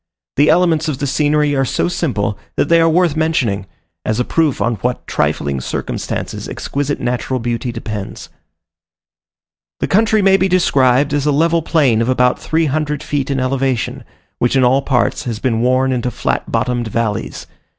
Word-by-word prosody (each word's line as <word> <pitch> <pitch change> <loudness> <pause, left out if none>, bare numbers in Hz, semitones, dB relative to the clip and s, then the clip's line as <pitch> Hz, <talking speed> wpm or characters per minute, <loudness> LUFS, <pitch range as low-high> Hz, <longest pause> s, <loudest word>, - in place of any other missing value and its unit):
The 145 +2 +4
elements 165 -3 +3
of 150 -4 -2
the 145 - -2
scenery 145 +1 +1
are 135 - +2
so 130 - 0
simple, 125 -13 -1 0.2
that - - 0
they 165 0 +5
are 165 - +4
worth 170 -1 +2
mentioning, 130 -12 0 0.4
as 110 +2 -1
a 125 - +1
proof 160 -5 +1
on 115 -1 0
what 125 +5 -3
trifling 70 -2 -1
circumstances - - -4
exquisite 145 0 -3
natural 125 +1 -2
beauty 120 +1 -2
depends. 110 -4 -6 1.5
The - - 0
country 215 +1 +3
may 195 0 +5
be 195 - +2
described 140 -7 +3
as 145 0 0
a - - +4
level 165 +3 +2
plain 140 -9 +2
of 115 - 0
about 125 -1 +2
three 160 +1 0
hundred 150 0 -2
feet 140 -2 -2
in 135 -1 0
elevation, 130 -2 -1 0.4
which 120 +2 +1
in 130 - +4
all 130 +2 +4
parts 130 -3 0
has 115 -3 -3
been 115 0 0
worn 130 +2 +2
into 125 -1 -1
flat 120 - -2
bottomed 120 -2 -1
valleys. 105 - -3
135 Hz, 170 wpm, -17 LUFS, 120-155 Hz, 1.5 s, they